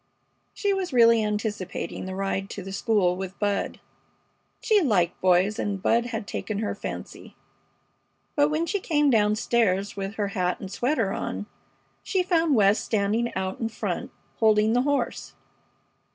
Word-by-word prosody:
She 405 -1 +1
was 380 -3 -2
really 230 -3 +5
anticipating 210 -5 -3
the 190 - -5
ride 195 0 -2
to 200 - -6
the 195 - -7
school 200 -3 +1
with 190 0 -6
Bud. 205 -1 -1 0.8
She 430 -3 +3
liked 190 - +1
boys, 185 +3 +3
and 200 -1 -2
Bud 235 +5 +2
had 225 -3 -4
taken 215 0 -4
her 215 0 -1
fancy. - - -8 1.0
But 290 0 +4
when 310 +2 0
she 405 +4 -1
came 295 -5 +2
down 210 -2 +3
stairs 205 -4 +1
with 195 +1 -4
her 205 -2 -1
hat 180 -3 -1
and 190 - -7
sweater 230 -2 0
on 95 +2 -4 0.6
she 370 - 0
found 330 -5 +2
West 205 -1 +4
standing 220 +3 0
out 190 0 -3
in 225 - -1
front, 220 - -4 0.3
holding 215 0 +4
the 245 - +3
horse. 285 +1 -1
210 Hz, 155 wpm, -25 LUFS, 195-245 Hz, 1.0 s, really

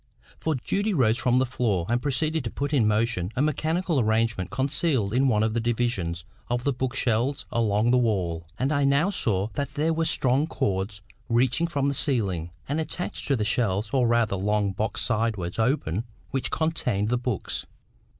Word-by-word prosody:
For 160 -1 0
Judy 200 - -1
rose 120 -5 +3
from 125 0 +2
the 130 - +3
floor, 115 -8 0
and 120 +1 +1
proceeded 155 +3 0
to - - -1
put 140 +4 -3
in 120 -7 +4
motion 105 -4 +1
a 130 - +1
mechanical 160 +1 0
arrangement 110 -4 +1
concealed 130 - 0
in 135 +2 +3
one 110 -4 +3
of 110 0 0
the 115 - +1
divisions 110 -8 -1 0.2
of 120 0 -1
the 140 - +1
book 130 +1 -3
shelves 130 +3 0
along 110 0 +2
the 125 - +4
wall; 90 -8 -1
and 135 +3 0
I 145 -1 +2
now 140 +7 +3
saw 105 - 0
that 140 +3 -3
there 160 +2 +1
were 165 0 0
strong 135 +1 +3
cords 95 -6 -2 0.3
reaching 125 +7 +2
from 145 -5 -1
the 140 - +1
ceiling, 100 - 0 0.2
and 150 +4 0
attached 175 +3 -3
to 140 - +3
the 110 -4 -1
shelf 105 -2 0
or 130 -3 +3
rather 115 -3 +2
long 105 +1 +1
box 100 +2 -2
sideways 105 -5 -1
open 110 - +1 0.3
which 135 - -1
contained 125 -10 0
the 125 0 +1
books. 125 -5 -3
120 Hz, 185 wpm, -26 LUFS, 105-140 Hz, 0.3 s, in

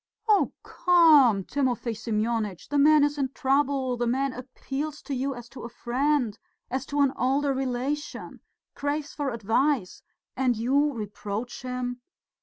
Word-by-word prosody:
"Oh, 420 -2 +4
come, 300 - +5
Timofey 250 -2 -1
Semyonitch! 220 -3 -2
The 290 0 +1
man 300 +1 +6
is 290 0 0
in 265 -1 0
trouble, 270 -2 +1
the 240 0 -1
man 265 +2 0
appeals 275 +4 -5
to 285 - -5
you 270 +1 -2
as 240 -1 -9
to 270 - -10
a 235 - -6
friend, 245 -1 0 0.3
as 260 +1 -2
to 290 0 0
an 275 -1 +3
older 275 +2 +1
relation, 265 +3 -3 0.3
craves 290 +1 -3
for 290 -2 -2
advice 230 0 0 0.3
and 250 -3 +1
you 275 +6 +2
reproach 210 +1 -5
him. 250 -1 -4
260 Hz, 145 wpm, -26 LUFS, 240-285 Hz, 0.3 s, man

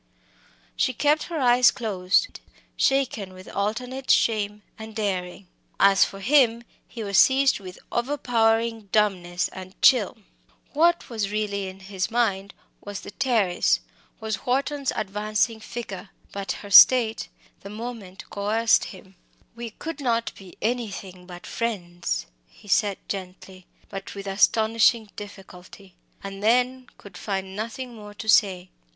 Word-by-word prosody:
She 255 - 0
kept 300 +3 +2
her 330 -2 -3
eyes 245 -1 +5
closed, 200 - 0 0.4
shaken 245 -8 0
with 185 0 -13
alternate 250 +6 -3
shame 210 -2 +2 0.2
and 220 0 -9
daring. 190 -3 -3 0.3
As 195 -1 +6
for 195 - -9
him, 235 -1 +3 0.2
he 230 - -7
was 200 -1 +2
seized 270 -1 +4
with 185 -2 -10
overpowering 230 -4 0
dumbness 185 -4 +1
and 185 0 -11
chill. 245 -7 +5 0.6
What 340 +3 +3
was 220 -4 -3
really 205 -2 -2
in 190 +1 -10
his 190 0 -3
mind 200 -4 -1 0.3
was 205 -1 -6
the - - -9
Terrace 215 -7 +1 0.4
was 220 -2 -4
Wharton's 275 +2 0
advancing 215 +2 -1
figure. 205 -4 -7 0.2
But 200 -1 -3
her 205 - -10
state 225 +2 +7 0.3
the 200 - -10
moment 215 -3 -8
coerced 220 +3 +2
him. 190 -1 -12 0.4
"We 235 0 -6
could 320 +9 -7
not 235 -4 0
be 190 -2 -14
anything 200 -6 -4
but 175 -1 -10
friends," 175 -7 -3 0.2
he 205 - -19
said 200 0 +2
gently, 185 -1 -8 0.2
but 195 0 -8
with 200 0 -7
astonishing 220 +2 +3
difficulty; 195 -2 -12 0.3
and 195 0 -7
then 250 +3 +2
could 200 - -13
find 190 -2 -4
nothing 230 +4 -5
more 210 -2 -11
to 220 - -8
say. 190 -4 +3
210 Hz, 135 wpm, -24 LUFS, 195-235 Hz, 0.6 s, state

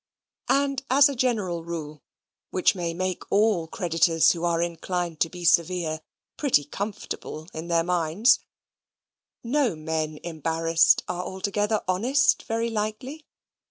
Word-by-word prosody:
And 275 -1 +1
as 280 +3 +6
a 280 - -4
general 210 -9 -1
rule, 155 -3 -6 0.5
which 185 - +2
may 175 -3 -3
make 185 +1 -3
all 200 -5 +2
creditors 165 -1 +2
who 170 -1 -4
are 170 -1 +1
inclined 170 0 -3
to 165 - +2
be 180 0 -8
severe 165 -1 +2 0.4
pretty 265 - +2
comfortable 180 -3 -6
in 160 +2 -6
their 170 -1 +2
minds, 180 +7 +3 1.0
no 250 - +1
men 155 0 -3
embarrassed 165 0 +2
are 180 0 -3
altogether 205 +3 -1
honest, 240 +10 +2
very 230 +1 -1
likely. 225 +8 -4
180 Hz, 125 wpm, -25 LUFS, 165-220 Hz, 1.0 s, as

